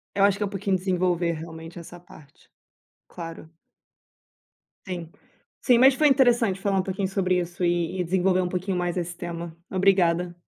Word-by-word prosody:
Eu 195 Hz, -, +3 dB
acho 200 Hz, -1 st, +2 dB
que 210 Hz, -, -2 dB
é -, -, +1 dB
um 200 Hz, -, -4 dB
pouquinho 195 Hz, -1 st, -1 dB
desenvolver 180 Hz, -2 st, 0 dB
realmente 165 Hz, +1 st, -9 dB
essa 175 Hz, +1 st, -11 dB
parte. 150 Hz, -5 st, -18 dB, 0.6 s
Claro. 165 Hz, -2 st, -9 dB, 1.4 s
Sim, 170 Hz, -3 st, -6 dB, 0.5 s
sim. 245 Hz, -3 st, +4 dB
Mas 265 Hz, +3 st, +7 dB
foi 300 Hz, +3 st, +3 dB
interessante 240 Hz, -7 st, +3 dB
falar 195 Hz, -1 st, 0 dB
um -, -, 0 dB
pouquinho 190 Hz, +1 st, -2 dB
sobre 185 Hz, -1 st, 0 dB
isso 175 Hz, +1 st, -4 dB
e 175 Hz, +1 st, 0 dB
e -, -, +1 dB
desenvolver 185 Hz, +1 st, +1 dB
um 180 Hz, -, -2 dB
pouquinho 185 Hz, +1 st, -2 dB
mais 175 Hz, 0 st, -2 dB
esse 175 Hz, 0 st, -3 dB
tema. 170 Hz, -2 st, -6 dB
Obrigada. 180 Hz, -2 st, +1 dB
180 Hz, 170 wpm, -25 LUFS, 170-195 Hz, 1.4 s, Mas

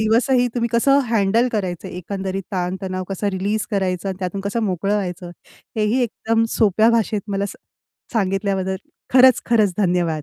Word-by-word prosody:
दिवसही 245 Hz, +3 st, +3 dB
तुम्ही 235 Hz, -1 st, 0 dB
कसं 275 Hz, +4 st, +4 dB
हँडल 225 Hz, +3 st, +2 dB
करायचं, 190 Hz, -3 st, -3 dB
एकंदरीत 190 Hz, +2 st, -4 dB
ताण-तणाव 185 Hz, +1 st, -3 dB
कसं 200 Hz, +1 st, -2 dB
रिलीज 200 Hz, +3 st, -1 dB
करायचं 190 Hz, -2 st, -1 dB
आणि 190 Hz, -1 st, -4 dB
त्यातून 190 Hz, +1 st, -3 dB
कसं 200 Hz, +4 st, -2 dB
मोकळं 195 Hz, +1 st, 0 dB
व्हायचं 180 Hz, -3 st, -3 dB, 0.5 s
हेही 215 Hz, +4 st, +1 dB
एकदम 225 Hz, 0 st, 0 dB
सोप्या 215 Hz, +1 st, +4 dB
भाषेत 220 Hz, -2 st, +1 dB
मला 200 Hz, 0 st, -1 dB
सांग -, -, -11 dB, 0.5 s
सांगितल्याबद्दल 195 Hz, -2 st, 0 dB, 0.3 s
खरंच 255 Hz, -1 st, +6 dB
खरंच 215 Hz, -5 st, +3 dB
धन्यवाद. 175 Hz, -5 st, +1 dB
200 Hz, 145 wpm, -21 LUFS, 185-225 Hz, 0.5 s, खरंच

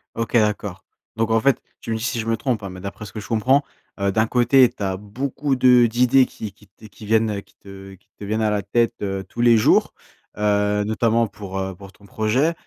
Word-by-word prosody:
OK 115 Hz, +1 st, -4 dB
d'accord, 105 Hz, -4 st, 0 dB, 0.3 s
donc 115 Hz, 0 st, -1 dB
en 115 Hz, -, +4 dB
fait- 135 Hz, 0 st, +2 dB, 0.2 s
tu -, -, -6 dB
me 110 Hz, -, 0 dB
dis 110 Hz, -, -6 dB
si 125 Hz, -1 st, -1 dB
je 110 Hz, -, -4 dB
me 115 Hz, -1 st, +1 dB
trompe 120 Hz, -3 st, -2 dB
hein- 100 Hz, -, -6 dB
mais 90 Hz, 0 st, -9 dB
d'après 100 Hz, +3 st, -7 dB
ce 100 Hz, -, -11 dB
que 110 Hz, -, -5 dB
je 105 Hz, -, -9 dB
comprends, 130 Hz, +6 st, +2 dB, 0.4 s
heu, 100 Hz, 0 st, +1 dB
d'un 110 Hz, +2 st, +1 dB
côté 125 Hz, +1 st, +4 dB
tu 120 Hz, -4 st, -8 dB
as 95 Hz, -1 st, -1 dB
beaucoup 130 Hz, +7 st, -3 dB
de 125 Hz, -1 st, +5 dB
d'idées 125 Hz, +3 st, +3 dB
qui 105 Hz, -3 st, -8 dB
qui 105 Hz, -1 st, -22 dB
t 110 Hz, +2 st, -16 dB
qui 105 Hz, +2 st, -14 dB
viennent, 110 Hz, 0 st, +2 dB
heu, 100 Hz, -, -4 dB
qui -, -, -27 dB
te 95 Hz, 0 st, -12 dB
qui 95 Hz, -, -31 dB
te -, -, -9 dB
viennent 110 Hz, +2 st, -2 dB
à 105 Hz, -, +1 dB
la 105 Hz, -1 st, 0 dB
tête, 115 Hz, +4 st, +1 dB
heu, 95 Hz, -1 st, -3 dB
tous 120 Hz, -, -5 dB
les 120 Hz, -1 st, +6 dB
jours, 110 Hz, -, +3 dB, 0.5 s
heu, 105 Hz, 0 st, +1 dB
notamment 115 Hz, +2 st, +1 dB
pour 100 Hz, -2 st, -8 dB
heu, 95 Hz, 0 st, -3 dB
pour 95 Hz, +1 st, -13 dB
ton 100 Hz, -, -21 dB
projet, 115 Hz, -, 0 dB
110 Hz, 245 wpm, -21 LUFS, 100-120 Hz, 0.5 s, les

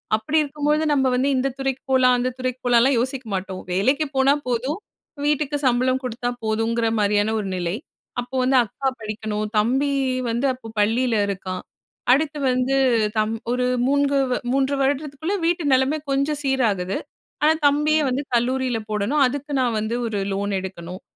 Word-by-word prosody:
அப்படி 220 Hz, +9 st, -1 dB
இருக்கும்போது, 300 Hz, +2 st, 0 dB
நம்ம 270 Hz, -2 st, +2 dB
வந்து 265 Hz, +3 st, +1 dB
இந்த 265 Hz, +2 st, +1 dB
துறைக்கு 270 Hz, -1 st, -2 dB
போலாம், 255 Hz, -1 st, +5 dB
அந்த 250 Hz, +1 st, 0 dB
துறைக்கு 255 Hz, 0 st, -2 dB
போலாம்லாம் 245 Hz, +1 st, +4 dB
யோசிக்க 260 Hz, 0 st, -2 dB
மாட்டோம். 185 Hz, 0 st, -4 dB
வேலக்கு 270 Hz, +11 st, +2 dB
போனா 270 Hz, +1 st, +5 dB, 0.2 s
போதும், 255 Hz, +7 st, -1 dB, 0.5 s
வீட்டுக்கு 295 Hz, -1 st, 0 dB
சம்பளம் 255 Hz, +2 st, +2 dB
குடுத்தா 245 Hz, 0 st, -3 dB, 0.2 s
போதுங்கிற 225 Hz, +1 st, 0 dB
மாரியான 205 Hz, +1 st, +2 dB
ஒரு 195 Hz, -, -5 dB
நிலை. 175 Hz, +2 st, -2 dB, 0.5 s
அப்போ 250 Hz, +2 st, -9 dB
வந்து 260 Hz, +1 st, +3 dB
அக்கா 270 Hz, +6 st, -4 dB
படிக்கணும், 215 Hz, 0 st, -3 dB
தம்பி 265 Hz, +6 st, +2 dB, 0.4 s
வந்து 240 Hz, +4 st, 0 dB
அப்ப 225 Hz, -3 st, -10 dB
பள்ளில 230 Hz, +3 st, +2 dB
இருக்கான். 185 Hz, -2 st, -4 dB, 0.5 s
அடுத்து 295 Hz, +2 st, +2 dB
வந்து 255 Hz, +2 st, +1 dB, 0.4 s
தம் 215 Hz, +1 st, +1 dB, 0.2 s
ஒரு 250 Hz, 0 st, 0 dB, 0.2 s
மூண்கு 285 Hz, 0 st, +2 dB, 0.3 s
3 270 Hz, +1 st, +1 dB
வருடத்துக்குள்ள, 285 Hz, +5 st, -1 dB
வீட்டு 345 Hz, -1 st, +1 dB
நிலமை 265 Hz, +4 st, +2 dB
கொஞ்சம் 280 Hz, +2 st, 0 dB
சீராகுது. 215 Hz, -9 st, 0 dB, 0.5 s
ஆனா, 310 Hz, -, +6 dB, 0.2 s
தம்பிய 300 Hz, +2 st, +2 dB
வந்து 260 Hz, +3 st, -1 dB
கல்லூரில 250 Hz, 0 st, 0 dB
போடணும். 215 Hz, +8 st, +1 dB
அதுக்கு 285 Hz, +3 st, -5 dB
நான் 240 Hz, -3 st, +1 dB
வந்து 220 Hz, +2 st, -2 dB
ஒரு 210 Hz, -3 st, -2 dB
லோன் 200 Hz, +1 st, -2 dB
எடுக்கணும். 185 Hz, -1 st, -7 dB
255 Hz, 150 wpm, -22 LUFS, 220-280 Hz, 0.5 s, ஆனா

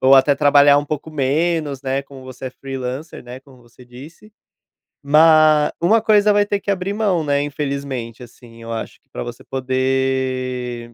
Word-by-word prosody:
ou 135 Hz, +1 st, +6 dB
até 135 Hz, +2 st, +5 dB
trabalhar 145 Hz, -1 st, +5 dB
um 145 Hz, -, -2 dB
pouco 155 Hz, +1 st, -5 dB
menos, 150 Hz, 0 st, -1 dB
né, 135 Hz, 0 st, -2 dB
como 135 Hz, -1 st, -14 dB
você 130 Hz, 0 st, -9 dB
é -, -, -5 dB
freelancer, 135 Hz, +3 st, -7 dB
né, 125 Hz, +2 st, -10 dB
como 130 Hz, -3 st, -20 dB
você 120 Hz, +1 st, -19 dB
disse. 145 Hz, -, -14 dB, 0.7 s
Ma 155 Hz, 0 st, +5 dB
uma 215 Hz, +6 st, +3 dB
coisa 210 Hz, -1 st, +3 dB
vai 205 Hz, 0 st, +3 dB
ter 205 Hz, -1 st, -1 dB
que 200 Hz, -, -7 dB
abrir 195 Hz, +1 st, -2 dB
mão, 200 Hz, -7 st, 0 dB
né, 145 Hz, -1 st, 0 dB
infelizmente 140 Hz, -5 st, -5 dB
assim, 120 Hz, -1 st, -16 dB
eu 115 Hz, 0 st, -6 dB
acho 115 Hz, -, -7 dB
que -, -, -47 dB
pra -, -, -6 dB
você 120 Hz, 0 st, -9 dB
poder 130 Hz, -2 st, -2 dB
135 Hz, 175 wpm, -19 LUFS, 130-155 Hz, 0.7 s, ou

